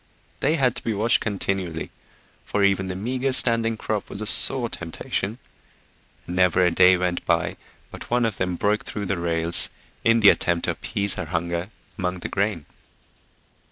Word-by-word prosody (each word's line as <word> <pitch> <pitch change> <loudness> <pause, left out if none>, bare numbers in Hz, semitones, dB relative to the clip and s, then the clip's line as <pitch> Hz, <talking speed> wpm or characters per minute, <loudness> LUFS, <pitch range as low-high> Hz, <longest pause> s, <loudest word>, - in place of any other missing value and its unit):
They 160 - +1
had 130 -6 +1
to - - -8
be 115 - -2
watched 110 +3 +2
continually, 95 -5 -3 0.5
for 105 - -1
even 95 -1 +1
the 90 - -5
meager 130 +7 -2
standing 115 -3 +4
crop 110 -2 -4
was 100 - -3
a 110 - -3
sore 125 +3 +4
temptation, 95 +3 -4 0.9
and 90 - -6
never 90 0 +3
a 90 - +2
day 90 +2 +5
went 90 -1 -2
by - - 0 0.4
but - - -10
one 120 0 +1
of 110 -4 -2
them 90 -1 -2
broke 105 +4 0
through 105 -1 -5
the 95 -2 -2
rails 85 0 +3 0.3
in 115 0 +3
the 100 - +8
attempt 85 -1 +1
to - - 0
appease 100 -1 -1
her - - -5
hunger 85 +2 -3 0.3
among 90 -1 -3
the - - -5
grain. 100 -6 -2
100 Hz, 175 wpm, -23 LUFS, 90-110 Hz, 0.9 s, the